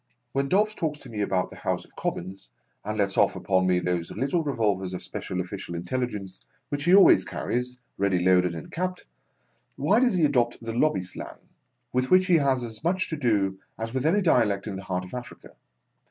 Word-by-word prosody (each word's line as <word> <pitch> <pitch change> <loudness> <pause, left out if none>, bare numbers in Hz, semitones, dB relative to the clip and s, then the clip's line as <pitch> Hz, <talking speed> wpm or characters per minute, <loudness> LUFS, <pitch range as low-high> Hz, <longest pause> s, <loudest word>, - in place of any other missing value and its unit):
When 135 +1 -1
Dobbs 210 +3 +3
talks 155 -6 -2
to 125 - -11
me 105 -2 -3
about 95 -2 0
the - - -11
House - - -2
of - - -24
Commons, 95 -6 -5 0.3
(and 105 +1 -3
lets 100 -2 +1
off 100 -1 +4
upon 95 -2 +1
me 90 -1 +3
those 90 -1 -1
little 140 +6 0
revolvers 100 -9 0
of - - -6
special 90 - -5
official 90 -1 -5
intelligence 95 +1 -4 0.3
which 145 0 -2
he 180 +2 +6
always 200 - +7
carries, 125 +1 -3 0.2
ready 100 -2 +2
loaded 90 -1 +3
and 80 - -8
capped), 180 +1 -3 0.7
why 220 - +3
does 245 -5 +3
he 170 -4 +4
adopt 120 -5 +1
the 115 -1 -5
Lobby 120 -5 +2
slang: 90 - -8 0.6
with 130 +1 +1
which 185 0 +5
he 180 -3 +5
has 135 -4 +1
as 115 +2 -8
much 185 +3 0
to 160 - -2
do 105 -9 +1 0.2
as 115 +1 -5
with 130 +3 0
any 200 +5 +3
dialect 110 - +2
in 105 -3 -4
the 95 0 -7
heart 90 -1 -2
of 90 - -13
Africa 125 -1 -8
115 Hz, 200 wpm, -26 LUFS, 95-145 Hz, 0.7 s, always